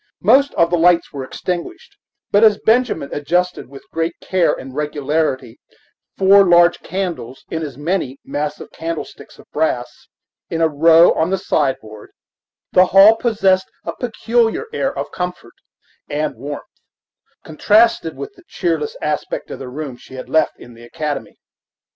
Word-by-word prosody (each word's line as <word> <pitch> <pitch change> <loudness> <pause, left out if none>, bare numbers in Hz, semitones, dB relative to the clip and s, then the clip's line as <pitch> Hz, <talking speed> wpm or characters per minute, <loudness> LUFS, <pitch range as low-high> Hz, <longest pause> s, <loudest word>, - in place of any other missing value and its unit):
Most 270 +8 +5
of 170 0 +2
the 175 - +2
lights 170 0 +3
were 140 -2 -5
extinguished; 180 - -6 0.4
but 205 +2 +4
as 215 -2 +6
Benjamin 225 - +1
adjusted 175 +2 -1
with 135 0 -13
great 165 +1 -2
care 185 -2 +1
and 130 0 -7
regularity 145 -4 -2 0.6
four 195 +1 +6
large 175 -1 +5
candles, 175 -10 -5
in 160 - -2
as 145 -5 -6
many 150 -3 -2
massive 150 +1 -4
candlesticks 165 -1 -7
of - - -16
brass, - - -2 0.4
in 165 - -3
a 165 - +4
row 165 +3 +5
on 160 - 0
the 195 - 0
sideboard, 130 - -2 0.6
the 185 0 +5
hall 195 +4 +7
possessed 195 -5 +1
a - - -5
peculiar 235 - 0
air 275 -11 0
of - - -4
comfort 180 -9 -5 0.6
and 150 0 -2
warmth, 140 +5 -6 0.8
contrasted 210 +1 +2
with 415 - -7
the 360 - -20
cheerless 165 -5 -2
aspect 150 0 -3
of - - -7
the 130 - -7
room 135 -1 -6
she 130 - -14
had 130 - -8
left 160 - +2
in 120 - -13
the 115 0 -15
academy. 145 +4 -5
165 Hz, 150 wpm, -18 LUFS, 145-195 Hz, 0.8 s, hall